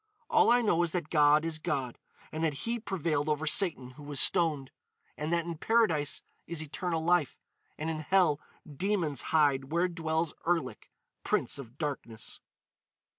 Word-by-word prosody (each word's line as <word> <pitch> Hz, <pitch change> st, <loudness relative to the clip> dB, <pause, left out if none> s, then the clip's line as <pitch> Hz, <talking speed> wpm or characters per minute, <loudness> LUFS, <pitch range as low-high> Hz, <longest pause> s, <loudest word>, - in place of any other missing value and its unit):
All -, -, +5 dB
I 240 Hz, 0 st, +4 dB
know 175 Hz, -6 st, +2 dB
is 170 Hz, -2 st, -1 dB
that 170 Hz, -4 st, -3 dB
God 150 Hz, 0 st, +4 dB
is 160 Hz, -1 st, -2 dB
God, 130 Hz, -5 st, -3 dB, 0.3 s
and 160 Hz, +1 st, -4 dB
that 150 Hz, -4 st, -2 dB
He 235 Hz, +1 st, -1 dB
prevailed 160 Hz, -8 st, -1 dB
over 150 Hz, +1 st, 0 dB
Satan 150 Hz, -6 st, +2 dB
who 145 Hz, -, -14 dB
was 145 Hz, -1 st, -3 dB
stoned. 150 Hz, -6 st, +3 dB, 0.4 s
And 150 Hz, +2 st, -4 dB
that 170 Hz, -1 st, +1 dB
in 170 Hz, -2 st, -6 dB
Paradise 170 Hz, -12 st, +2 dB, 0.2 s
is 170 Hz, -1 st, -4 dB
eternal 160 Hz, +2 st, -3 dB
life, 175 Hz, -4 st, +2 dB, 0.4 s
and 155 Hz, -, -4 dB
in 160 Hz, -1 st, -2 dB
hell 160 Hz, -2 st, +2 dB, 0.2 s
demons 160 Hz, -, -1 dB
hide 145 Hz, -4 st, +3 dB
where 170 Hz, +2 st, +2 dB
dwells 160 Hz, -2 st, -2 dB
Erlik, 145 Hz, -10 st, -1 dB, 0.3 s
Prince -, -, 0 dB
of 125 Hz, -1 st, -11 dB
Darkness." 135 Hz, -8 st, -5 dB
160 Hz, 160 wpm, -30 LUFS, 145-170 Hz, 0.4 s, All